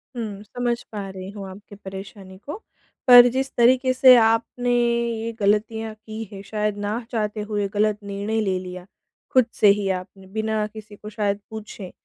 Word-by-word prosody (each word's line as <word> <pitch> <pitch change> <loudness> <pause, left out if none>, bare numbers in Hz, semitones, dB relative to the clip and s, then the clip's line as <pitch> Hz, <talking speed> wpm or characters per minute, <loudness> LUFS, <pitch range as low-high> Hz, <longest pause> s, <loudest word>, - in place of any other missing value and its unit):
हुँ, 210 -4 -5
समझ 240 +2 -2
पा 205 -3 -5
रही 190 0 -8
हूँ 200 -2 -8
आपकी 205 +2 -12
परेशानी 195 -1 -10
को। 295 - -5 0.5
पर 245 -1 +10
जिस 265 +2 -2
तरीके 255 +2 +4
से 255 0 +8
आपने 230 +2 +1
ये 235 -1 0
गलतियाँ 215 +2 0
की 215 +1 -8
हैं, 195 -1 -8
शायद 210 -1 -2
ना 205 +2 -2
चाहते 215 -2 -2
हुए 205 -1 -1
गलत 210 0 +1
निर्णय 205 +2 -2
ले 190 -3 0
लिया, 180 -1 -8 0.5
खुद 255 -2 +5
से 210 - +6
ही 200 -1 +3
आपने, 190 +1 -5
बिना 220 +1 -1
किसी 215 -1 -12
को 210 +1 -10
शायद 205 -1 -1
पूछे। 215 -3 -8
215 Hz, 170 wpm, -23 LUFS, 200-230 Hz, 0.5 s, पर